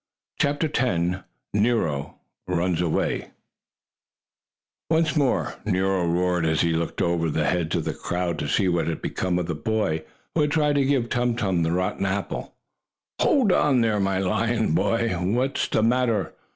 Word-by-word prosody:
CHAPTER 145 +3 +1
X 90 -6 0 0.3
NERO 105 -10 0 0.3
RUNS 90 -1 0
AWAY 85 -3 -1 1.6
Once 160 -1 +2
more 140 -4 +1
Nero 95 -2 +1
roared 90 0 +1
as 80 -1 +2
he 85 -1 +2
looked 80 0 -1
over 85 -2 +1
the 75 0 0
heads 85 -2 0
of - - -1
the - - -1
crowd 85 -2 -3
to - - -2
see 95 +6 +2
what 85 -2 +1
had 85 - -2
become 90 -1 -1
of 90 - -1
the 85 - -2
boy 80 -2 -1 0.3
who 160 - +2
had 150 - +2
tried 150 -2 +2
to 140 - +3
give 135 -4 +1
Tum 120 -1 +1
Tum 95 -7 0
the 80 0 +1
rotten 90 +2 -1
apple. 100 +1 -3 0.7
"Hold 250 -9 +4
on 140 -7 +3
there, 110 -2 +1
my 95 -1 +1
lion 110 +4 0
boy! 115 -8 +1
What's 120 +9 0
the 110 - +1
matter? 115 -4 +1
95 Hz, 165 wpm, -24 LUFS, 85-120 Hz, 1.6 s, Hold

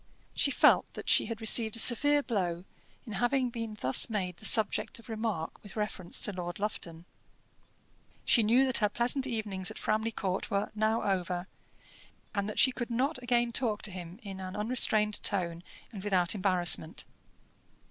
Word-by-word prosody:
She - - +1
felt - - +3
that - - -9
she - - +4
had 225 -1 -6
received 220 0 +4
a - - +1
severe 290 +5 +5
blow 180 -7 -3 0.4
in 220 - -8
having 245 +4 0
been 230 -3 -6
thus 130 - +5
made 185 -5 -3
the - - -9
subject 215 -2 +2
of 230 0 -16
remark 220 -7 -4
with 205 - -13
reference 210 -5 -2
to - - +1
Lord 175 -1 -6
Lufton. 175 -5 -5 1.2
She 235 - +5
knew 235 +5 +3
that 260 - +2
her 210 -2 +2
pleasant 250 +5 0
evenings 210 -5 -3
at 215 - -10
Framley 220 +1 -1
Court 190 -3 -3
were 200 +1 -2
now 215 +1 0
over, 180 -2 -2 0.9
and 200 0 -2
that 215 - -7
she 260 - +5
could 245 -1 -5
not 255 +4 -1
again 240 -1 +1
talk 230 -3 0
to 210 - -2
him 180 +1 -9
in 195 -2 -8
an 185 +1 -7
unrestrained 210 -1 +2
tone 175 -4 -2 0.3
and 200 -5 -9
without 185 -4 +2
embarrassment. 185 -5 +1
210 Hz, 170 wpm, -29 LUFS, 185-235 Hz, 1.2 s, severe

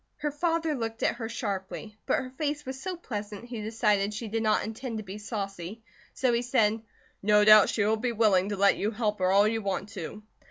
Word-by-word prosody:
Her 295 0 -2
father 325 +1 0
looked 225 -4 -4
at - - +1
her 225 -2 -4
sharply; 210 -1 -4
but - - +3
her 255 - -4
face 295 +2 -3
was 265 0 -6
so 375 -1 -3
pleasant 210 - -6
he 240 -3 -6
decided 210 -2 +1
she 225 +1 -5
did 225 +2 -1
not 215 -1 +2
intend 225 +2 -5
to 215 - -5
be 200 +1 -8
saucy, 205 -1 -5 0.3
so 255 -2 +2
he 235 - +2
said: 225 -3 +2 0.4
"No 210 +1 +4
doubt 215 -1 +8
she 205 - +1
will 220 +1 +2
be 240 +2 -1
willing 205 -4 +3
to 205 - -3
let 200 +1 +4
you 210 - 0
help 215 -2 -1
her 185 0 +2
all 200 +2 +5
you 225 +1 0
want 200 0 -2
to." 205 +1 -7
220 Hz, 225 wpm, -28 LUFS, 205-240 Hz, 0.4 s, doubt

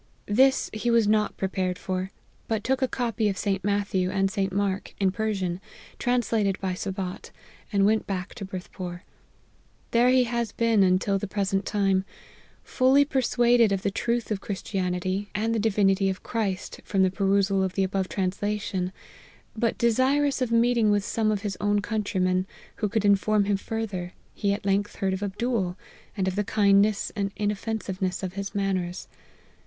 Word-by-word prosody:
This 265 +6 +3
he 215 +3 -1
was 230 -2 +4
not 210 0 +2
prepared 185 -1 -1
for, 185 0 -3 0.4
but 220 -2 -1
took 265 0 0
a 260 - +3
copy 230 -4 -1
of 195 - -3
St. 195 -2 -1
Matthew 200 -2 0
and 195 0 +1
St. 195 0 -1
Mark, 200 0 -2
in 195 -2 +3
Per 220 +2 -1
sian, 185 -3 -2 0.4
translated 225 -5 +1
by 190 -1 -2
Sabat, 185 0 -5 0.4
and 200 -2 +3
went 220 +1 +2
back 185 -1 -4
to - - -8
Berth 185 -1 -7
pore. 175 -1 -6 0.9
There 240 +2 +4
he 255 0 +5
has 235 -1 -2
been 230 -3 +3
until 190 +1 +3
the 205 - -4
present 195 0 -1
time, 195 -2 +2 0.6
fully 270 +2 +4
persuaded 240 -4 +3
of 195 0 -1
the 200 - 0
truth 235 +2 -1
of 200 -2 -1
Christianity, 190 0 -2
and 220 +2 0
the 225 - +1
divinity 195 -2 +2
of 190 - -4
Christ, 205 -5 -3
from 195 -2 +1
the 185 - +3
perusal 195 0 +2
of 190 -1 -1
the 195 - +1
above 190 0 -1
translation, 190 -1 -2 0.6
but 230 +1 0
desirous 265 +4 +2
of 250 -2 0
meeting 230 -1 +3
with 205 -1 +2
some 220 0 0
of 210 -1 -1
his 200 -2 -2
own 205 0 +2
countrymen, 190 -3 0 0.3
who 210 - -1
could 210 0 0
inform 205 +1 +3
him 205 0 +1
fur 225 +3 -3
ther; 180 -4 -6 0.2
he 200 - 0
at 200 0 -3
length 200 +1 0
heard 190 -1 -1
of 190 - -3
Abdool, 205 -2 -1 0.4
and 190 -1 0
of 185 - -1
the 205 - +1
kind 200 -1 +4
ness 210 0 0
and 200 -2 -1
inoffensiveness 205 -3 -2
of 185 -1 -3
his 200 +1 -5
manners. 185 -3 -2
200 Hz, 175 wpm, -26 LUFS, 190-220 Hz, 0.9 s, he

